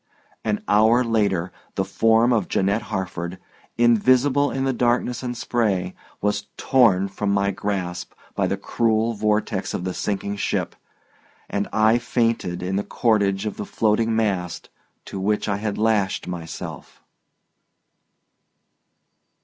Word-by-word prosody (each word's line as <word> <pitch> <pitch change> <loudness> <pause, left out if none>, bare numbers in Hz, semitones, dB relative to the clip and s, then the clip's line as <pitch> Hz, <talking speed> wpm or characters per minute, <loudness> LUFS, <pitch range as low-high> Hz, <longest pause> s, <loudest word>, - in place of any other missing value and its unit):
An 105 -1 -1
hour 110 +4 +4
later 100 -6 0 0.2
the - - 0
form 115 +2 +3
of 105 -6 +1
Janette 100 +3 +1
Harford, 90 -3 -4 0.4
invisible 130 +5 +4
in 135 - -2
the 135 - +1
darkness 120 0 +1
and 125 -2 -4
spray, 100 -7 0 0.3
was 105 0 -1
torn 110 -8 +4
from 100 +1 -3
my 100 0 +2
grasp 90 -3 -3 0.2
by - - 0
the - - -1
cruel 115 0 +1
vortex 105 0 -1
of - - -3
the 95 0 -2
sinking 100 +1 -2
ship, - - -1 0.7
and 100 0 -2
I 110 +2 +4
fainted 115 -7 -1
in 95 +2 -1
the 100 - 0
cordage 100 -4 +1
of 105 - -4
the 105 - -4
floating 110 +1 +1
mast 95 -6 -1 0.3
to 95 - -6
which 105 +3 0
I 100 -1 0
had 105 0 -3
lashed 105 -3 +1
myself. 85 -2 -7
105 Hz, 135 wpm, -23 LUFS, 95-115 Hz, 0.7 s, hour